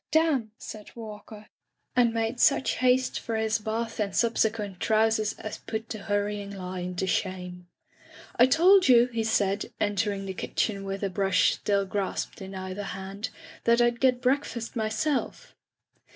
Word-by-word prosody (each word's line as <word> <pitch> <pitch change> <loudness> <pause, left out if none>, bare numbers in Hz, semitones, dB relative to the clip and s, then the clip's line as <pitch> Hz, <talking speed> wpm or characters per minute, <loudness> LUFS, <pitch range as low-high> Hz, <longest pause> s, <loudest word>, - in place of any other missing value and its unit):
"Damn! 305 -8 +2
said 210 -1 -9
Walker, 215 -1 -9 0.5
and 240 -2 +4
made 225 +2 -2
such 275 -3 +3
haste 255 0 +2
for 230 - -4
his 220 0 +1
bath 225 +2 -3
and 200 -3 -1
sub 235 -1 +2
sequent 210 -4 0
trousers 220 -1 +2
as 215 - -7
put 220 0 -5
the 215 - -5
hurrying 205 0 -2
lion 180 -2 -5
to 190 - -1
shame. 180 -1 -3 0.7
"I 245 - +6
told 360 +7 +6
you,'* 245 -1 +6
he 225 -1 0
said, 205 -2 0
entering 205 -1 0
the 190 - -4
kitchen 200 +1 -2
with 195 +1 -4
a 200 - +1
brush 195 -1 +3
still 200 -1 0
grasped 195 0 -3
in 190 0 -7
either 190 +1 -5 0.2
hand, 195 +3 -5 0.4
that 235 0 +5
Fd 240 0 +2
get 255 -2 +3
breakfast 250 -3 -1
myself.' 240 - -2
215 Hz, 155 wpm, -27 LUFS, 195-235 Hz, 0.7 s, I